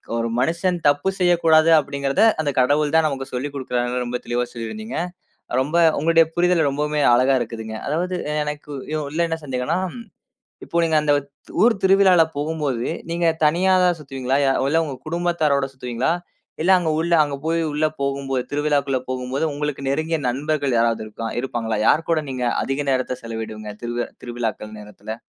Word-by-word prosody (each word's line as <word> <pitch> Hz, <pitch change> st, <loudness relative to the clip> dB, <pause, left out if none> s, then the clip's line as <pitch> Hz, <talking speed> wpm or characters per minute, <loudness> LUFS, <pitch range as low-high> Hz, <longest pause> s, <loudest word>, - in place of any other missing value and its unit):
ஒரு 115 Hz, 0 st, 0 dB
மனுஷன் 170 Hz, +6 st, +1 dB
தப்பு 145 Hz, +6 st, +2 dB
செய்யக்கூடாது 165 Hz, -3 st, +4 dB
அப்படிங்கறத, 140 Hz, +2 st, 0 dB, 0.2 s
அந்த 155 Hz, -2 st, 0 dB
கடவுள் 145 Hz, +3 st, +3 dB
தான் 160 Hz, -1 st, +5 dB
நமக்கு 135 Hz, -2 st, -3 dB
சொல்லிக் 135 Hz, +3 st, -4 dB
குடுக்குறாருன்னு 125 Hz, -2 st, -2 dB
ரொம்ப 120 Hz, +1 st, -2 dB
தெளிவா 120 Hz, 0 st, 0 dB
சொல்லியிருந்தீங்க. 215 Hz, -, -6 dB, 0.6 s
ரொம்ப 145 Hz, +5 st, -1 dB, 0.2 s
உங்களுடைய 165 Hz, +2 st, +4 dB
புரிதல் 175 Hz, -2 st, +3 dB
ரொம்பவுமே 150 Hz, +2 st, -1 dB
அழகா 130 Hz, +3 st, +4 dB
இருக்குதுங்க. 110 Hz, -2 st, -5 dB
அதாவது 180 Hz, +5 st, -1 dB, 0.3 s
எனக்கு 150 Hz, 0 st, -6 dB, 0.4 s
உள்ள 150 Hz, +4 st, -5 dB
என்ன 165 Hz, 0 st, -2 dB
சந்தேகம்னா, 135 Hz, +4 st, -1 dB, 0.9 s
இப்போ 170 Hz, -, 0 dB
நீங்க 160 Hz, -1 st, +2 dB
அந்த 150 Hz, -1 st, +2 dB, 0.5 s
ஊர் 230 Hz, 0 st, +5 dB
திருவிழால 190 Hz, -3 st, +6 dB
போகும்போது 145 Hz, -5 st, -2 dB, 0.2 s
நீங்க 170 Hz, 0 st, +1 dB, 0.2 s
தனியாதான் 180 Hz, +2 st, +3 dB
சுத்துவீங்களா? 135 Hz, -2 st, -2 dB
அ -, -, +1 dB, 0.2 s
இல்ல 165 Hz, +3 st, +3 dB
உங்க 140 Hz, -3 st, -5 dB
குடும்பத்தாரோட 160 Hz, -5 st, +1 dB
சுத்துவீங்களா? 125 Hz, +2 st, -2 dB, 0.5 s
இல்ல 185 Hz, -, +4 dB
அங்க 165 Hz, -3 st, 0 dB
உள்ள 170 Hz, +1 st, 0 dB
அங்க 145 Hz, -2 st, -4 dB
போய் 165 Hz, +1 st, +1 dB
உள்ள 150 Hz, +1 st, +1 dB, 0.2 s
போகும்போது, 135 Hz, -2 st, -1 dB
திருவிழாக்குள்ள 145 Hz, -2 st, +1 dB
போகும்போது 130 Hz, +3 st, -2 dB
உங்களுக்கு 145 Hz, -2 st, -3 dB
நெருங்கிய 155 Hz, +3 st, 0 dB
நண்பர்கள் 140 Hz, -1 st, 0 dB
யாராவது 115 Hz, -1 st, +1 dB
இருக்கா 115 Hz, +2 st, -6 dB
இருப்பாங்களா? 115 Hz, -4 st, -2 dB
யாரு 160 Hz, -, +4 dB
கூட 160 Hz, -2 st, +2 dB
நீங்க 125 Hz, -1 st, -2 dB, 0.2 s
அதிக 135 Hz, +2 st, -2 dB
நேரத்த 130 Hz, -1 st, -1 dB
செலவிடுவீங்க 110 Hz, -2 st, -6 dB
திருவ 120 Hz, 0 st, -3 dB
திருவிழாக்கள் 115 Hz, -3 st, -4 dB
நேரத்துல? 105 Hz, +1 st, -8 dB
145 Hz, 150 wpm, -22 LUFS, 125-160 Hz, 0.9 s, திருவிழால